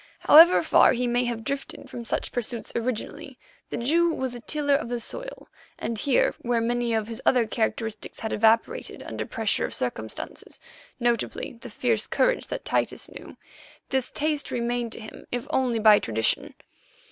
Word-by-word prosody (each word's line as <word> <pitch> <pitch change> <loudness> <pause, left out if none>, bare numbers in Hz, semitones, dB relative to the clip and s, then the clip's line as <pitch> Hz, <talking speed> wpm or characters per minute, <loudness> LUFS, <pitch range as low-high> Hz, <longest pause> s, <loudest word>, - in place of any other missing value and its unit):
However 330 +4 +8
far - - +5
he 250 0 -1
may 245 +1 +1
have 235 -2 -3
drifted 275 +4 -5
from 235 -1 -7
such - - -2
pursuits, 240 -1 -3
originally 235 -1 -4 0.3
the - - -3
Jew 330 +8 +2
was 260 -5 -3
a 240 - -7
tiller 290 +3 0
of 275 -4 0
the 240 0 -2
soil, - - -6 0.3
and 230 - -3
here, 275 0 +2
where 240 -1 +1
many 240 +1 0
of 220 -1 -1
his 225 -1 -6
other 245 -3 +4
characteristics 220 -1 -3
had 220 - -3
evaporated 225 - +1
under - - -5
pressure - - 0
of - - -3
circumstances—notably 235 0 -4
the 245 - -8
fierce 225 0 0
courage - - +1
that - - -5
Titus - - -1
knew—this 265 -2 -7
taste 300 -1 -1
remained 240 -1 -2
to - - -3
him, 215 -1 -11
if 245 -1 -3
only 250 -3 +1
by 215 -1 +7
tradition. 110 0 -1
240 Hz, 160 wpm, -26 LUFS, 230-265 Hz, 0.3 s, However